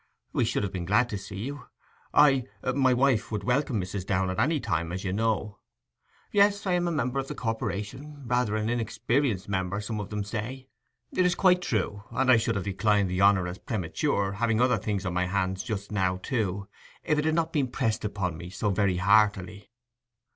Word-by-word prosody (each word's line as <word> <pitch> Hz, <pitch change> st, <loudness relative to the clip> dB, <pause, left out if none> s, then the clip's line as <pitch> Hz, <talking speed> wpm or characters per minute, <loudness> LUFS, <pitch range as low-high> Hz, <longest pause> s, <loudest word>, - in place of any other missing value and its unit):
'We -, -, +2 dB
should -, -, 0 dB
have 100 Hz, -, -2 dB
been 90 Hz, -2 st, -3 dB
glad 110 Hz, +6 st, +3 dB
to 105 Hz, -, -3 dB
see 100 Hz, 0 st, -8 dB
you. 140 Hz, +4 st, -6 dB, 0.5 s
I—my 135 Hz, -1 st, +3 dB
wife 125 Hz, -4 st, +2 dB
would 105 Hz, -2 st, -2 dB
welcome 125 Hz, 0 st, +1 dB
Mrs. 90 Hz, +1 st, -4 dB
Downe 95 Hz, -1 st, 0 dB
at 95 Hz, -, -3 dB
any 155 Hz, 0 st, +2 dB
time, 90 Hz, -8 st, -2 dB
as 95 Hz, +1 st, -4 dB
you 95 Hz, -2 st, -2 dB
know... 105 Hz, -1 st, -1 dB, 0.7 s
Yes, 205 Hz, 0 st, +3 dB
I 190 Hz, -, 0 dB
am 175 Hz, 0 st, +1 dB
a -, -, 0 dB
member 135 Hz, -3 st, -1 dB
of 135 Hz, -, -3 dB
the -, -, -5 dB
corporation—rather 125 Hz, +2 st, -2 dB
an 110 Hz, 0 st, -1 dB
inexperienced 115 Hz, -1 st, 0 dB
member, 95 Hz, 0 st, -1 dB
some 105 Hz, +1 st, -4 dB
of 105 Hz, -, -5 dB
them 105 Hz, -1 st, -2 dB
say. 120 Hz, +6 st, -5 dB, 0.4 s
It 185 Hz, -, +2 dB
is 180 Hz, -1 st, +2 dB
quite 180 Hz, -1 st, +4 dB
true; 105 Hz, -, -1 dB
and 130 Hz, -1 st, +2 dB
I 120 Hz, -, +7 dB
should 115 Hz, 0 st, 0 dB
have 100 Hz, -, -2 dB
declined 100 Hz, -1 st, +1 dB
the 90 Hz, +1 st, 0 dB
honour 100 Hz, -2 st, +5 dB
as 90 Hz, +1 st, -6 dB
premature—having 110 Hz, -, -1 dB
other 125 Hz, +1 st, +3 dB
things 100 Hz, -3 st, -2 dB
on 90 Hz, -, -2 dB
my 90 Hz, +1 st, 0 dB
hands 95 Hz, 0 st, -1 dB
just 100 Hz, -2 st, -5 dB
now, 95 Hz, -3 st, +1 dB
too—if 105 Hz, -, -3 dB
it 150 Hz, -, 0 dB
had 160 Hz, 0 st, +2 dB
not 165 Hz, -1 st, 0 dB
been 145 Hz, -5 st, +1 dB
pressed 115 Hz, -3 st, -1 dB
upon 100 Hz, -5 st, -2 dB
me 85 Hz, +1 st, -8 dB
so 100 Hz, +2 st, -1 dB
very 95 Hz, -2 st, +1 dB
heartily. 100 Hz, +1 st, +2 dB
105 Hz, 195 wpm, -27 LUFS, 100-130 Hz, 0.7 s, I